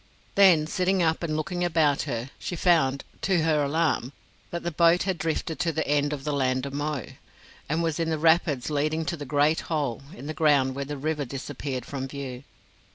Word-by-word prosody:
Then, 185 -6 +6
sitting 185 +3 +1
up 160 -1 +1
and 155 -3 -1
looking 175 +3 -2
about 160 -5 +2
her, 120 +1 -3
she 175 - -4
found, 155 -6 +2 0.2
to 180 -4 +2
her 155 -2 +2
alarm, 145 -3 0 0.4
that 170 - -5
the 175 - -2
boat 170 +2 +4
had 185 -3 -2
drifted 160 +1 -2
to 175 -2 +1
the 160 0 -2
end 145 0 +2
of 145 -2 -4
the 150 - -2
Land 130 -1 0
of 140 - -6
Mo, 145 -3 -2 0.6
and 165 +3 0
was 165 -1 -1
in 165 -1 0
the 160 - 0
rapids 155 -4 +2
leading 155 +2 0
to 170 - -2
the 145 -3 -7
Great 145 +3 +3
Hole 145 -8 -1
in 140 - -10
the 155 - -4
ground 145 -5 +3
where 140 +1 -4
the 145 +1 -5
river 150 +1 -1
disappeared 135 -1 -5
from 135 -2 -4
view. 135 -2 -7
150 Hz, 205 wpm, -26 LUFS, 140-165 Hz, 0.6 s, Then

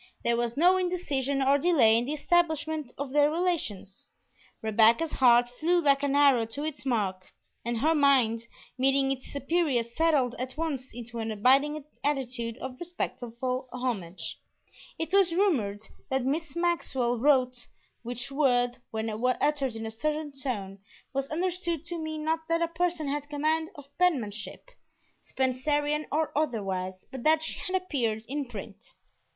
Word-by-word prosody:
There 235 - +2
was 235 +1 -1
no 360 +4 +5
indecision 280 -7 0
or 275 +2 +4
delay 275 -9 +5
in 235 +1 +2
the 285 - -2
establishment 315 -3 0
of 275 -1 -4
their 295 +1 +4
relations; 310 - -2 0.6
Rebecca's 225 +8 +4
heart 245 -2 +5
flew 320 +9 +1
like 280 -4 +3
an 285 -1 0
arrow 275 -6 +5
to 280 +6 -5
its 275 -4 -4
mark, 195 -6 -1 0.3
and 235 0 -2
her 310 +8 +3
mind, 255 -6 +3 0.3
meeting 270 +1 +3
its 265 -1 -5
superior, 285 -3 +1
settled 265 0 +1
at 255 +2 -5
once 290 -6 -3
into 235 0 -7
an 225 0 -2
abiding 275 +7 +3 0.2
attitude 250 -5 -2
of 260 -1 -7
respectful 255 -7 -4
homage. 220 -9 -4 0.6
It 325 +2 -4
was 380 -4 +4
rumored 235 - +1 0.3
that 265 -1 0
Miss 300 +2 -2
Maxwell 265 -9 0
"wrote," 255 -2 +2 0.3
which 245 +3 -4
word, 245 -4 +2
when 220 0 -3
uttered 255 +4 0
in 225 0 -5
a 220 - -4
certain 300 +6 -2
tone, 215 -8 -4 0.3
was 275 0 -2
understood 340 -1 -2
to 345 0 -4
mean 315 -1 -4
not 320 +1 -1
that 335 0 +2
a - - +1
person 335 -2 -1
had 290 +1 -3
command 310 +2 0
of 285 0 -14
penmanship, 230 - -1 0.5
Spencerian 290 +3 0
or 310 +1 0
otherwise, 195 -10 -2
but 265 - -6
that 315 +3 +3
she - - -2
had 370 - -3
appeared 235 -11 -2
in 285 +2 -2
print. - - -10
275 Hz, 150 wpm, -28 LUFS, 240-315 Hz, 0.6 s, no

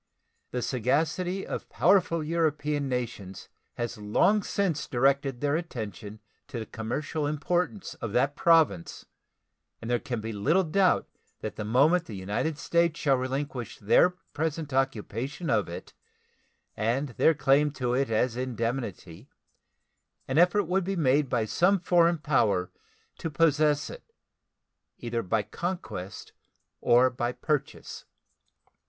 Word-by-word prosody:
The 125 -1 -3
sagacity 160 - 0
of - - -6
powerful 175 -3 +3
European 150 -3 0
nations 115 -7 -5 0.3
has 120 -1 -4
long 110 - +2
since 180 -8 -1
directed 135 0 +1
their 145 0 +1
attention 110 - -6 0.3
to 140 - -6
the 110 - -4
commercial 145 +8 -3
importance 175 +6 -1
of 115 - -3
that 135 +4 +2
Province, 160 - +2 0.7
and 115 - -5
there 120 - +2
can 120 0 -4
be 110 +1 -5
little 155 - +2
doubt 185 +3 +2 0.3
that - - -5
the 110 - -4
moment 145 +11 +3
the 110 - -8
United 105 +11 -2
States 170 +1 +1
shall 140 -2 +3
relinquish 130 -2 -4
their 110 - +4 0.2
present 155 -2 -3
occupation 135 - -2
of 105 -8 +1
it 85 - -8 0.8
and 120 +7 0
their 160 +6 +3
claim 140 +1 +3
to 125 -4 -1
it 135 0 +1
as 115 +2 +1
indemnity 115 - -4 1.0
an 135 +4 +1
effort 180 +4 +4
would 185 +2 0
be 195 +2 -2
made 145 -3 +2
by 115 -3 +1
some 185 - +2
foreign 175 -1 +3
power 115 - +1 0.5
to 165 - -3
possess 150 -1 +2
it, - - -13 0.9
either 120 -1 -3
by 105 +1 0
conquest 110 - -6 0.5
or 125 +2 +5
by 120 0 -2
purchase. 145 +2 -3
135 Hz, 130 wpm, -27 LUFS, 115-165 Hz, 1.0 s, or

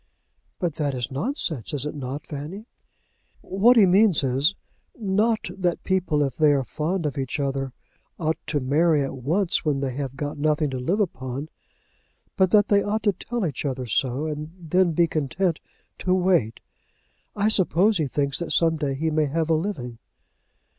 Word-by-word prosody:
"But 175 -5 -2
that 145 -3 -1
is 125 -1 -3
nonsense; 150 - -2
is 140 0 -2
it 150 - -3
not, 140 +1 -6
Fanny?" 155 +9 -7 0.8
"What 225 +6 +4
he 210 - +8
means 190 -3 +4
is, 135 +8 +2 0.4
not 215 +2 +1
that 180 -3 -1
people 180 -6 +1
if 135 -3 -3
they 150 -2 +5
are 135 -2 +1
fond 165 +7 -2
of 145 -2 -2
each 135 +2 -3
other 135 -1 -2 0.5
ought 160 -1 -1
to 150 -2 0
marry 150 +3 +2
at 135 - -4
once 165 +9 0
when 145 -3 0
they 135 -2 -2
have 135 0 -4
got 145 +1 -4
nothing 150 -1 +1
to 130 - -3
live 175 +12 0
upon, 135 -6 -3 0.9
but 190 -3 +3
that 205 +1 +4
they 200 -1 +4
ought 215 +2 -1
to 205 -2 +3
tell 235 +4 -3
each 145 -6 -3
other 130 -3 -3
so 130 +4 0
and 155 0 -5
then 175 +1 +1
be 170 +2 +4
content 165 +3 -1 0.4
to 185 0 +1
wait. 175 - +1 0.7
I 205 +1 +1
suppose 200 -1 +3
he 155 - +1
thinks 140 +1 -1
that 170 - -4
some 165 -1 +3
day 140 -3 -2
he 160 +3 -1
may 155 -1 +2
have 160 +3 -1
a - - +5
living." 155 - -3
155 Hz, 180 wpm, -24 LUFS, 140-185 Hz, 0.9 s, he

